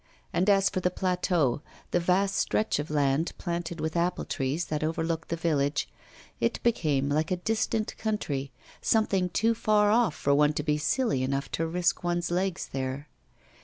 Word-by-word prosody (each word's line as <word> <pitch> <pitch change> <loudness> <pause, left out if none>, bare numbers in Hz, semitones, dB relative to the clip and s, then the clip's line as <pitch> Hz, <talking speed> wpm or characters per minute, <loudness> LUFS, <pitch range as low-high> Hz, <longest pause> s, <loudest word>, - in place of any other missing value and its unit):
And 185 +4 +2
as 195 -1 +5
for 185 - -1
the 180 - +1
plateau, 180 -7 0 0.3
the 175 - +3
vast 190 +3 +2
stretch 215 -8 +1
of 145 - -4
land 145 +1 +1
planted 170 -1 -4
with 160 +1 -2
apple 175 +1 0
trees 140 +4 -1
that 155 0 -2
overlooked 160 0 -2
the 170 - 0
village, 145 -3 0 0.5
it 115 - 0
became 150 - +1
like 155 +3 0
a 185 - +1
distant 220 +3 -1
country, 145 -11 -2 0.3
something 195 -5 +2
too 225 +5 +2
far 210 -2 +3
off 225 -7 +3
for 140 - +1
one 150 +1 +4
to 150 - -2
be 150 0 +1
silly 150 - +1
enough 135 +2 -2
to 165 - -1
risk 175 +2 0
one's 175 0 -1
legs 185 0 -1
there. 135 +2 -3
170 Hz, 170 wpm, -28 LUFS, 150-190 Hz, 0.5 s, as